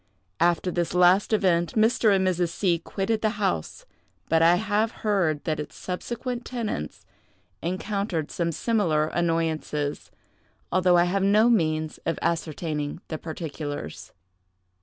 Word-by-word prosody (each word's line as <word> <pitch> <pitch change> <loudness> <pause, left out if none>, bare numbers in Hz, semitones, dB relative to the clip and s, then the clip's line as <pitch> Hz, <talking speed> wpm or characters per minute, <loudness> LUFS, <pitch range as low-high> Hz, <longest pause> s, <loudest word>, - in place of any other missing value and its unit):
After 175 +2 +2
this 175 0 -1
last 180 +4 +5
event, 175 -6 +2
Mr. 220 0 +4
and 190 -1 +3
Mrs. 175 -2 +1
C—— 170 -1 0
quitted 210 +6 -2
the 215 0 0
house; 195 - -2 0.4
but 160 0 +3
I 170 +1 +6
have 215 +3 0
heard 175 -8 +1
that 155 -1 -1
its 150 0 -6
subsequent 240 +6 -4
tenants 220 - -4 0.6
encountered 185 -2 -2
some 170 -1 -1
similar 165 -6 +1
annoyances, 160 -4 -1 0.6
although 180 -1 +4
I 175 - +5
have 185 +3 0
no 210 +4 +4
means 155 -6 0
of 165 - 0
ascertaining 155 -2 -2
the 155 - -4
particulars. 150 - -6
175 Hz, 130 wpm, -25 LUFS, 160-205 Hz, 0.6 s, I